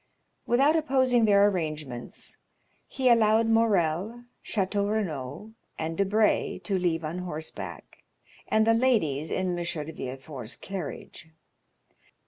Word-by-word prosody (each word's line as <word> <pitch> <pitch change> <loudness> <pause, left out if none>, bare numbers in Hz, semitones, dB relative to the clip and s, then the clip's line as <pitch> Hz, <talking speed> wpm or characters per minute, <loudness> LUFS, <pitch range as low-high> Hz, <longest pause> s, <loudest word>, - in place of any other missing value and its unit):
Without 275 +6 +4
opposing 260 -6 +3
their 200 -1 +5
arrangements, 155 -9 -4 0.5
he 265 -1 -1
allowed 225 -1 +5
Morrel, 220 -1 +1 0.2
Château 200 0 0
Renaud, 170 -2 -3 0.3
and 160 +1 -3
Debray 205 +3 +2
to 195 -3 0
leave 165 -3 0
on 165 +4 -4
horseback, 160 -3 -7 0.5
and 220 0 +3
the 225 - +5
ladies 195 - +1
in 185 0 -1
M. - - -2
de 160 -2 -4
Villefort's 130 -2 -7
carriage. 180 -3 -7
195 Hz, 110 wpm, -27 LUFS, 155-225 Hz, 0.5 s, their